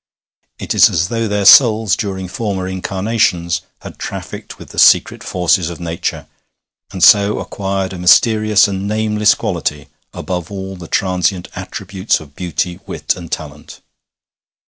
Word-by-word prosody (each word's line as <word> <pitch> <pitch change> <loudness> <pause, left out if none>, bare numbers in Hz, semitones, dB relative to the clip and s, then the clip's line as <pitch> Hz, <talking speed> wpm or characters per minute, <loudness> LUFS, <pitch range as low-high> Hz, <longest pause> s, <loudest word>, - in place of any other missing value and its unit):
It - - -4
is - - +6
as 85 +4 -1
though 115 -1 -1
their 105 -1 -1
souls, 110 -2 +6
during 95 -3 -4
former 95 -1 -4
incarnations, 95 -2 -1 0.2
had - - -11
trafficked - - -7
with - - -13
the - - -5
secret - - +4
forces 90 -1 0
of 85 - -8
nature, 85 -1 -4 0.7
and 95 -2 -3
so 105 0 +5
acquired 95 -1 -4
a 90 - -7
mysterious 110 +3 +4
and 100 0 -4
nameless 105 0 +2
quality 75 -1 -4 0.2
above 90 -3 -5
all 95 -1 -6
the 90 -2 -10
transient 90 0 -1
attributes 95 +2 -3
of 70 -2 -15
beauty, 90 0 -3
wit, - - -2
and 85 -2 -10
talent. 75 -1 -7
95 Hz, 140 wpm, -16 LUFS, 90-105 Hz, 0.7 s, is